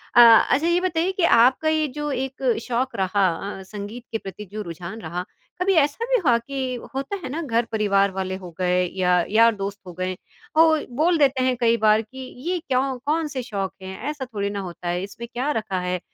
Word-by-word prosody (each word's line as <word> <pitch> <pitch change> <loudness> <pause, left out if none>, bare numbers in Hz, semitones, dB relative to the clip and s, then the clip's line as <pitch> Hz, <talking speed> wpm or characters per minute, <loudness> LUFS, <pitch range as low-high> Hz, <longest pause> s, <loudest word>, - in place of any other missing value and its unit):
अ, - - +8 0.3
अच्छा 305 +5 +3
ये 345 +1 +3
बताइए 360 0 0
कि 375 -2 -2
आपका 255 +7 +4
ये 310 -1 +1
जो 295 -1 -2
एक 265 -1 -1
शौक 250 +1 -1
रहा 190 0 +2 0.3
अ, - - -9
संगीत 210 +4 -7
के 225 - 0
प्रति 195 +1 -8
जो 215 0 -4
रुझान 175 +6 -7
रहा, 175 +3 -4 0.4
कभी 385 +1 +3
ऐसा 295 +11 -2
भी - - +5
हुआ 235 -2 +5
कि 260 +1 -4 0.2
होता 275 +9 -2
है 260 - -4
ना 320 +5 -3
घर-परिवार 215 -6 +1
वाले 190 0 -3
हो 175 - -7
गए 180 0 +2 0.2
या 180 -1 +2 0.2
यार-दोस्त 205 -2 +2
हो 180 - -8
गए, 185 0 -1 0.4
वो 325 - +9 0.4
बोल 340 0 +4
देते 270 -3 +3
हैं 255 - +2
कई 235 -1 +3
बार 215 +1 +5
कि 260 +5 -13 0.3
ये 365 - +1
क्यों 265 -2 -1
कौन-से 300 -4 -1
शौक 195 -2 -3
हैं, 190 0 -7
ऐसा 290 -3 -4
थोड़ी 200 -1 -1
ना 200 0 -4
होता 175 0 -9
है, 175 +2 -1
इसमें 235 +4 -8
क्या 255 +5 -1
रखा 195 -4 -3
है, 180 0 -1
235 Hz, 205 wpm, -23 LUFS, 195-275 Hz, 0.4 s, वो